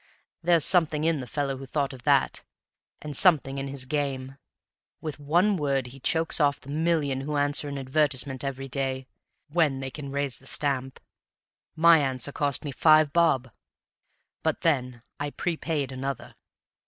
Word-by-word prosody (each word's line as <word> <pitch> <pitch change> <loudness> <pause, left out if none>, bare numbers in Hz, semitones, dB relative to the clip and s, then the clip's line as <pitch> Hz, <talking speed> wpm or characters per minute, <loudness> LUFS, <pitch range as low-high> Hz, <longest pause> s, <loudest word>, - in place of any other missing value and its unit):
There's 170 -2 +4
something 160 -4 +3
in 165 -2 +1
the 125 - -6
fellow 140 0 -2
who 135 0 -9
thought 140 0 -1
of 130 - -11
that, - - +2 0.6
and 150 -1 -6
something 140 -5 +3
in 135 - -4
his 135 -1 -5
game; 135 -2 -3 0.6
with 155 -2 -6
one 175 +8 +2
word 140 -4 0
he 130 +2 -11
chokes 160 +6 0
off 145 -1 +2
the 140 - -14
million 155 -4 0
who 150 +2 -3
answer 145 0 0
an 140 - -5
advertisement 135 -1 0
every 135 0 -4
day 135 -1 -3 0.4
when 150 -4 +1
they 135 0 -5
can 145 -1 -7
raise 140 -2 -2
the 135 - -13
stamp. 135 -3 -1 0.8
My 165 0 +6
answer 135 -1 -1
cost 145 0 -1
me 145 - -3
five 155 +1 +4
bob; 135 -8 +2 0.9
but - - -1
then 125 -7 0 0.2
I 145 0 -2
prepaid 155 -3 -2
another." 130 -2 -5
140 Hz, 160 wpm, -26 LUFS, 135-155 Hz, 0.9 s, My